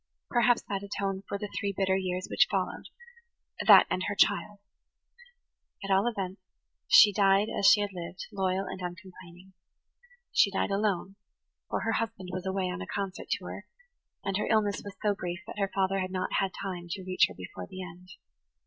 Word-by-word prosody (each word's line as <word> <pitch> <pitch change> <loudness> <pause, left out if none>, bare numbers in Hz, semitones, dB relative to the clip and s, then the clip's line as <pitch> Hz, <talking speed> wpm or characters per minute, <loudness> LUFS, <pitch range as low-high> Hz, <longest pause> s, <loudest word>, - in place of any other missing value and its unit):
Perhaps 240 0 +3
that 195 -1 -3
atoned 200 -1 -3
for 200 - -3
the 210 +1 -5
three 200 -1 -2
bitter 190 -1 +2
years 185 -1 -2
which - - +3
followed–that, 475 0 +1
and 185 - -1
her 205 - -2
child. 205 +1 +2 1.3
At 195 - -3
all 195 +4 +4
events, 195 -4 -3 0.5
she 205 -1 +8
died 195 +1 +3
as 200 - +3
she 205 - +7
had 205 -1 -2
lived, 175 0 -7
loyal 190 -1 -1
and 185 - -7
uncomplaining. 180 0 -10 0.8
She - - +5
died 200 +1 -1
alone, 195 -1 -1 0.5
for - - -1
her 225 - 0
husband 225 -5 -3
was 185 +1 -4
away 190 0 -1
on 180 - -5
a - - -6
concert 195 -2 -4
tour, - - -4 0.6
and 195 -1 -1
her 210 - -1
illness 210 -2 +1
was 200 -1 -8
so 210 -1 +3
brief 175 -2 -5
that - - -8
her 195 -1 +1
father 195 0 +1
had 185 -1 -2
not 185 0 -3
time 185 -2 -2
to 190 +2 -5
reach 185 0 +4
her - - -12
before 90 0 -8
the 185 0 -7
end. 180 +1 -12
195 Hz, 175 wpm, -29 LUFS, 185-205 Hz, 1.3 s, she